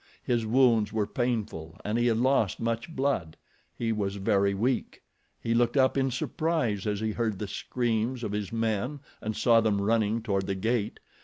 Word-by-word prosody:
His 120 -2 0
wounds 115 -3 +4
were 110 -1 0
painful 105 -10 -3
and 105 +2 -1
he 120 +1 +2
had 115 -2 +2
lost 125 -4 +2
much 115 +4 -2
blood. 130 - -1 0.4
He 115 -1 -1
was 100 -2 -1
very 100 0 +2
weak. 125 +6 -1 0.4
He 115 - -1
looked 120 +3 +2
up 130 -1 +4
in 135 -1 +2
surprise 125 - -1
as 105 0 -1
he 110 0 0
heard 110 -2 -1
the 105 - -4
screams 120 +3 -1
of 105 - -2
his 105 -2 -3
men 115 +5 -1 0.2
and 110 0 -3
saw 115 -1 +5
them 105 -2 +1
running 110 +1 +1
toward 100 -4 -1
the 95 - -1
gate. 110 +2 -1
115 Hz, 180 wpm, -28 LUFS, 105-120 Hz, 0.4 s, saw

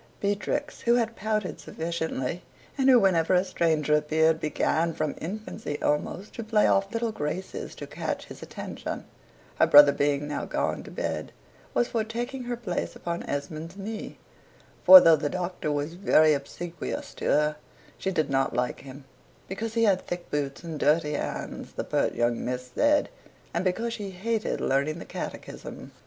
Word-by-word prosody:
Beatrix, 205 +8 -2
who 235 0 +3
had 230 -1 0
pouted 215 -2 -2
sufficiently, 160 -2 -3 0.3
(and 270 -1 +3
who, 255 -2 +8
whenever 185 -3 +3
a 180 - +4
stranger 160 -5 +1
appeared, 155 +1 +2
began, 160 +1 0
from 155 -3 -1
infancy 205 -3 -5
almost, 175 +7 -1
to 230 - -5
play 220 -1 +3
off 195 0 +2
little 230 0 -1
graces 185 +1 -4
to - - -7
catch - - -4
his - - -11
attention,) - - -6 0.5
her - - +6
brother 145 0 +9
being 145 0 0
now 150 - -3
gone - - -1
to - - -11
bed, - - -3 0.4
was 240 - +3
for 225 -2 0
taking 240 +4 -4
her 240 0 -3
place 190 -7 -3
upon 170 -1 -4
Esmond's 155 +5 -4
knee: 210 +2 -6 0.7
for, 280 - +12
though 165 -9 +6
the 150 -1 -2
Doctor 175 -3 -3
was 145 +2 -2
very 155 -4 +4
obsequious 165 +4 -5
to - - -7
her, 150 0 +3 0.4
she 190 - -1
did 155 -6 0
not 135 -2 +1
like 125 0 -1
him, 140 +1 -11 0.4
because 220 +4 -4
he 230 - +3
had 195 -4 +4
thick 175 0 -5
boots 140 0 -2
and 160 -3 -5
dirty 150 +1 +2
hands - - -4
(the - - -3
pert - - 0
young 120 0 0
miss 125 0 -4
said), 295 0 +3 0.5
and 170 - 0
because 225 +6 -1
she 210 -4 -5
hated 215 +4 -2
learning 140 +4 +1
the - - -8
catechism. - - -7
170 Hz, 170 wpm, -27 LUFS, 150-215 Hz, 0.7 s, for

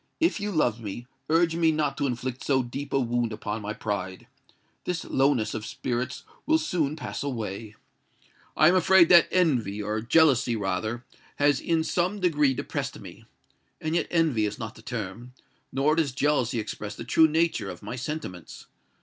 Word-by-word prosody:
If 330 -7 +2
you 205 +1 -3
love 125 - +1
me, 110 +3 -6 0.2
urge 165 +1 +3
me 165 -1 +3
not 150 -2 0
to 140 - +1
inflict 125 0 -4
so 130 -2 +2
deep 135 +4 -6
a 135 - +2
wound 120 -2 0
upon 105 0 -4
my 105 +1 -4
pride. 95 -4 -4 0.6
This 180 -2 -3
lowness 135 -5 +1
of 110 - -4
spirits 125 +2 -3 0.2
will 315 +1 +5
soon 170 - -1
pass 155 - -5
away: 110 -5 -5 0.8
I 155 - +6
am 175 - +5
afraid 185 -1 +5
that 175 -2 +7
envy—or 110 - 0
jealousy, 130 -2 +4
rather—has 110 +8 -2
in 165 -1 0
some 180 +5 0
degree 150 -7 +2
depressed - - -4
me. - - -12 0.5
And 155 0 -3
yet - - +1
envy 155 -11 +2
is 105 - -6
not 115 -1 -6
the - - -15
term—nor 125 +6 -4
does 155 -6 0
jealousy 130 -4 +1
express 105 -1 -5
the - - -7
true 160 +7 +5
nature, 165 +2 0
of - - -9
my 105 +4 -5
sentiments. 125 - -6
130 Hz, 165 wpm, -26 LUFS, 110-160 Hz, 0.8 s, that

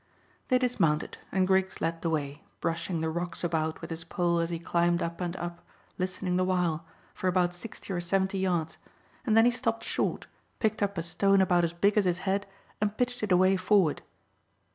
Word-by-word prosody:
They 255 - +4
dismounted, 165 -12 0
and 190 0 +2
Griggs 190 0 +2
led 165 0 -2
the 165 - 0
way, 145 -2 -2 0.2
brushing 165 0 -2
the 160 - 0
rocks 175 +1 -4
about 160 -2 -1
with - - -7
his 165 +1 -4
pole 170 0 0
as 165 0 0
he 170 - -2
climbed 170 +1 +1
up 170 +1 -4
and 175 0 -2
up, 175 -1 -5 0.4
listening 185 0 -1
the 185 - +2
while, 175 -3 0 0.3
for 185 - -3
about 180 -1 +2
sixty 195 +1 -7
or 175 - -1
seventy 190 +2 0
yards, 175 -4 -1 0.5
and 220 -1 +4
then 225 - +7
he 245 - +5
stopped 230 -2 -1
short, - - -1 0.3
picked 215 -1 0
up 200 -1 0
a 165 - -1
stone 195 +4 +3
about 180 -2 +3
as 170 - +1
big 200 +5 +3
as 200 - +1
his 180 -1 +2
head, 200 +1 0 0.3
and 210 0 0
pitched 245 0 -1
it 210 -2 -2
away 185 +1 +5
forward. 185 -4 +3
180 Hz, 200 wpm, -29 LUFS, 170-195 Hz, 0.5 s, then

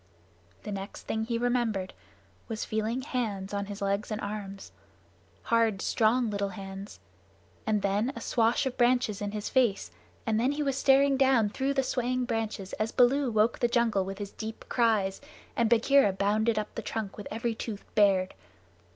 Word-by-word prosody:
The 210 - -5
next 195 0 -6
thing 220 0 -2
he 230 0 -1
remembered 235 -6 0 0.5
was 220 -1 -4
feeling 220 +4 -2
hands 210 -8 -3
on 200 0 -2
his 205 0 -6
legs 200 +1 -1
and 215 -1 -3
arms 200 -2 -6 0.7
hard, 230 -4 +2
strong, 225 +3 +2
little 200 -1 -1
hands 195 0 -8 0.7
and 210 -2 +1
then 205 +6 +1
a - - -5
swash 230 +2 +1
of 260 - -3
branches 240 -4 +2
in 205 - -2
his 210 0 -4
face, 245 -7 +1 0.3
and 220 -1 +1
then 255 +5 +2
he 295 +1 -1
was 275 -2 0
staring 275 0 +4
down 260 -6 +4
through 270 +5 -1
the 270 - +2
swaying 255 0 -1
boughs 225 -5 -3
as 215 +1 0
Baloo 255 +2 +3
woke 220 +1 +2
the 240 - +3
jungle 235 -5 +2
with 195 +1 -6
his 205 -1 -6
deep 220 0 -7
cries 215 -5 +1 0.3
and 235 -4 +2
Bagheera 235 -1 +4
bounded 215 +3 +1
up 215 - -3
the - - -4
trunk 215 -3 -4
with 205 - -8
every 230 +2 -2
tooth 220 -2 -6
bared. 195 -3 +3
220 Hz, 175 wpm, -29 LUFS, 205-245 Hz, 0.7 s, staring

